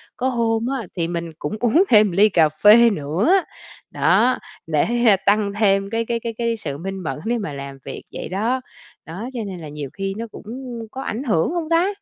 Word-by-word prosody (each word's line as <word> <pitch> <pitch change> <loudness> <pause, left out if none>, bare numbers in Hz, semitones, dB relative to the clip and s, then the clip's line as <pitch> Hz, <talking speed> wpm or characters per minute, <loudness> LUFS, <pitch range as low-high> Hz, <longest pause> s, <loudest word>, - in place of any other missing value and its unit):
có 255 - -1
hôm 230 -2 0 0.2
á 220 - -7
thì 165 -1 0
mình 170 -1 -4
cũng 150 - -3
uống 245 - +4
thêm 215 -2 +6
một 185 - -4
ly 210 +3 +6
cà 165 -5 +4
phê 215 +9 +6
nữa, 175 - +1 0.6
đó, 255 +1 +3 0.3
để 155 -2 +2 0.4
tăng 200 0 +2
thêm 195 -2 +2
cái 230 +1 -1
cái 235 0 -1
cái 230 0 -4
cái 230 -1 -1
sự 145 -9 -5
minh 195 +4 -5
mẫn 155 - -4
để 240 +2 0
mà 200 -10 -4
làm 140 0 -7
việc, 135 - -7
vậy - - -6
đó. 225 +7 -1 0.4
Đó, 190 +10 -6
cho 245 - -4
nên 185 -2 -6
là 155 -2 -8
nhiều 145 -2 -6
khi 195 0 -3
nó 230 - -4
cũng - - -11 0.5
có 265 - -6
ảnh 240 0 -4
hưởng 210 - +1
hông 335 -2 -3
ta? 335 +2 +3
210 Hz, 215 wpm, -21 LUFS, 170-235 Hz, 0.6 s, thêm